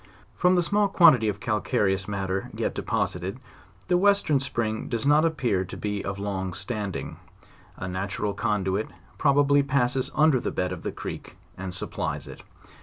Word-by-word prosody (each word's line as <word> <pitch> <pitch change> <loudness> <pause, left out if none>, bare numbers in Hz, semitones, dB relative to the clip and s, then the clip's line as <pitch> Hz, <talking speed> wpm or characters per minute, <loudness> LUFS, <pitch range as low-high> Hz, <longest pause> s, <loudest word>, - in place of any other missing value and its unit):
From 180 +1 +3
the 175 - +3
small 205 +3 +2
quantity 155 - +6
of 105 0 -4
cal 110 -4 -1
careous 95 -1 0
matter 95 -1 -2
yet - - -1
deposited, 90 +7 -2 0.5
the 180 0 +3
western 200 -7 +3
spring 115 -5 -2
does 115 +1 -2
not 150 +3 +5
appear 125 - +1
to 90 - -8
be 105 -1 -3
of 100 0 -4
long 95 -3 -3
standing; 100 -3 -4 0.6
a 95 - -5
natural 100 +2 -2
conduit 105 -2 -1 0.3
probably 145 0 +4
passes 130 -2 +1
under 155 -4 +4
the - - -2
bed 90 0 -2
of 90 - -5
the - - -3
creek, - - -8 0.2
and 95 -1 -5
supplies - - -3
it. - - -10
110 Hz, 165 wpm, -26 LUFS, 95-140 Hz, 0.6 s, quantity